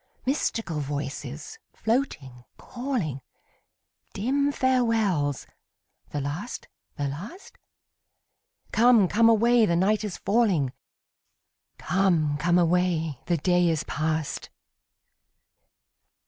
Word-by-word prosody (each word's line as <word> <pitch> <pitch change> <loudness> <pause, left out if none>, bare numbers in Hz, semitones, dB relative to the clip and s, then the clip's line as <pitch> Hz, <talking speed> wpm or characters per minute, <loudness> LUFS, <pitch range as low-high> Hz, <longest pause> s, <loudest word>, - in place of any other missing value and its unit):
Mystical 225 - -1
voices, 145 0 -5
floating, 150 - -2
calling; 240 - -4 0.9
Dim 280 +7 0
farewells 225 - +1 0.6
the 145 - -3
last, 150 - -5 0.3
the 145 - -1
last? 190 - -8 1.2
Come, 230 -4 +5
come 225 +5 +4
away, 230 0 +4
the 170 - +2
night 205 +4 +2
is 205 -4 -4
falling; 195 - +1 1.0
'Come, 170 -5 +1
come 175 +4 +2
away, 170 -4 +1
the 175 - +2
day 175 +2 +2
is 160 -2 0
past.' 155 0 -3
180 Hz, 90 wpm, -26 LUFS, 150-230 Hz, 1.2 s, Come